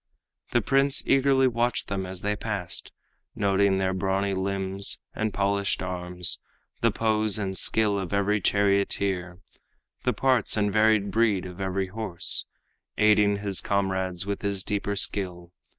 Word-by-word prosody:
The - - +2
prince 135 0 +2
eagerly 135 -1 +4
watched 120 -1 0
them 95 -2 -3
as 90 -1 -8
they 105 +1 -1
passed, 100 -4 -4 0.4
Noting 100 -1 +2
their 95 0 0
brawny 95 +1 0
limbs 95 0 -1 0.2
and 110 0 -2
polished 100 0 0
arms, 90 -1 -1 0.4
The - - +4
pose 110 -2 +1
and 95 -2 -3
skill 105 0 +3
of 95 -2 -5
every 100 +1 +1
charioteer, 100 -2 0 0.6
The 125 - +1
parts 125 0 +1
and 105 -1 +1
varied 110 -2 +3
breed 110 -4 +2
of 90 +1 -8
every 95 0 -2
horse, 100 -4 -1 0.5
Aiding 105 -1 +3
his 100 -2 +1
comrades 95 -2 -1
with 100 0 -3
his 100 -2 -2
deeper 100 0 -2
skill. 90 -3 -2
100 Hz, 140 wpm, -26 LUFS, 95-105 Hz, 0.6 s, eagerly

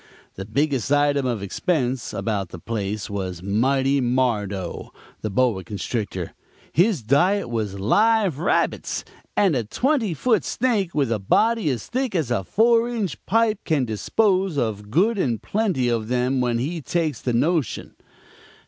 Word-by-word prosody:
The 95 - -7
biggest 135 +3 0
item 145 -2 +3
of 115 -5 -2
expense 130 - -1
about 100 -5 -2
the 90 - -8
place 105 +1 -3
was 95 -3 -5
'Mighty 135 +7 +2
Mardo,' 115 -7 -1 0.3
the 110 - -2
boa 105 -2 +1
constrictor; 100 -1 -4 0.4
his 180 - +2
diet 175 - +2
was 105 -4 -2
live 205 - +2
rabbits, 175 - 0 0.3
and 190 -7 +4
a 120 - 0
twenty 230 - 0
foot 235 - +2
snake 220 -8 0
with 140 -5 +1
a 110 - 0
body 220 - +2
as 120 -6 -2
thick 255 -4 -2
as 155 -8 0
a 115 -5 0
four 230 - +3
inch 215 -9 -3
pipe 225 -1 +2
can 145 -5 +1
dispose 185 - +1
of 105 -5 -2
good 200 - +2
and 120 - -1
plenty 195 - 0
of 115 -2 0
them 125 +2 +1
when 120 -1 +1
he 155 +7 -3
takes 155 -2 -1
the 125 - -1
notion. 150 - 0
130 Hz, 150 wpm, -23 LUFS, -, 0.4 s, and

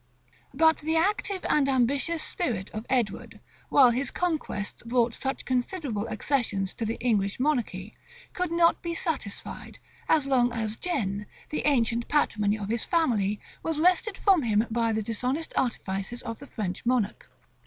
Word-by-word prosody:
[*] - - -31 0.2
But 320 0 +4
the 320 +2 -1
active 385 +2 0
and 280 -2 +3
ambitious 275 +5 +1
spirit 230 - -3
of 215 +2 -6
Edward, 240 -6 -1 0.3
while 260 -4 +7
his 260 +4 -1
conquests 315 - -2
brought 235 0 +1
such 265 +3 -3
considerable 250 - -2
accessions 220 -4 -1
to 230 - -3
the 225 +1 -2
English 210 -4 +1
monarchy, 235 -8 -1 0.4
could 360 -2 -2
not 335 0 +3
be 340 -1 -3
satisfied, 290 - -4 0.4
so 275 - -5
long 245 -3 +3
as 220 -2 -2
Guienne, 210 - -2 0.2
the 300 - -1
ancient 235 -4 +2
patrimony 215 -8 +2
of 205 -1 -5
his 230 0 0
family, 215 - +1 0.2
was 325 -2 -2
wrested 365 +5 +3
from 385 -6 +4
him 220 -3 +2
by 230 0 +1
the 220 0 -1
dishonest 250 +9 -2
artifices 210 -2 -2
of 230 -1 -5
the 280 - -11
French 190 -8 -4
monarch. 240 -4 0
245 Hz, 155 wpm, -27 LUFS, 215-305 Hz, 0.4 s, while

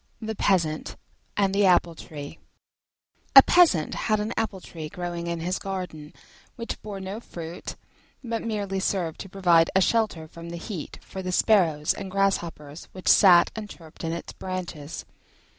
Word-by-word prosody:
THE 220 -1 -4
PEASANT 170 -7 0 0.4
AND 195 -1 +2
THE 200 0 +4
APPLE 175 -2 +4
TREE 145 -3 -9 1.0
A 270 - +13
Peasant 320 - +4
had 215 -1 0
an 215 +3 -2
Apple 220 -4 -2
tree 160 -3 -8
growing 175 0 -5
in 170 -1 -3
his 180 +3 -1
garden, 180 -6 -6 0.4
which 230 -2 -6
bore 205 -2 -6
no 190 +3 -5
fruit, 170 -6 -8 0.5
but 230 -2 -3
merely 205 -4 -2
served 180 -4 -1
to 195 - -7
provide 175 -3 +4
a - - +6
shelter 205 -7 +1
from 170 +1 -10
the 170 - -6
heat 170 -2 -6
for 190 - -7
the 185 -1 -3
sparrows 170 -7 +3
and 195 - -7
grasshoppers 170 -6 -1
which 185 - -9
sat 180 -3 +7
and 215 -2 -6
chirped 160 -3 -12
in 165 - -1
its 170 - -6
branches. 175 -5 -6
185 Hz, 160 wpm, -26 LUFS, 165-200 Hz, 1.0 s, A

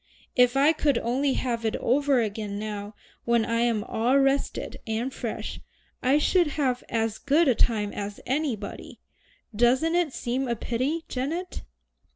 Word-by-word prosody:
If 250 +1 +4
I 290 +4 +5
could 290 -5 +1
only 265 +4 0
have 235 -3 -2
it 220 0 0
over 275 0 +2
again 210 -2 -3
now 210 0 -5 0.3
when 235 -1 +2
I 230 0 0
am 230 -3 +1
all 240 +6 +1
rested 275 0 0
and 230 +4 -2
fresh, 235 -3 -5 0.4
I 265 +3 +4
should 345 +3 +3
have 255 -4 0
as 225 -1 -1
good 295 +4 +3
a 255 - +5
time 215 -3 +1
as 205 0 -5
anybody. 260 -7 -3 0.6
Doesn't 255 +8 +3
it 345 -4 +2
seem 255 +1 -2
a 235 - 0
pity, 260 +9 -2
Janet?" 320 +8 -3
250 Hz, 155 wpm, -26 LUFS, 225-280 Hz, 0.6 s, I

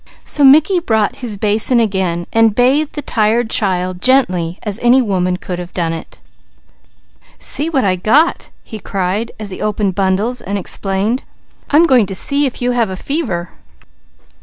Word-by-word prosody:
So 290 - 0
Mickey 310 +7 +5
brought 220 - 0
his 240 -6 -4
basin 215 +4 +2
again, 190 -6 -1
bathing 245 +7 +3
the 295 - -5
tired 225 +1 0
child 185 -3 -1
gently 185 -10 +1
as 210 0 -3
any 240 +2 +4
woman 185 -6 0
could 180 -1 -6
have 175 0 -9
done 165 -2 -1
it. 165 - -9 1.2
"See 305 +3 -1
what 275 -5 0
I 185 -1 +1
got!" 285 - +1
he 220 - -9
cried 195 +3 -3
as 210 -2 -5
he - - -8
opened 210 -2 -1
bundles 200 +6 -1
and 200 +2 -4
explained. 195 +5 -2 0.5
"I'm 310 +4 +5
going 250 - +3
to 195 - -4
see 280 +7 +2
if 250 - -6
you 250 - +1
have 220 -7 -1
fever." 190 - -3
215 Hz, 160 wpm, -15 LUFS, 185-255 Hz, 1.2 s, Mickey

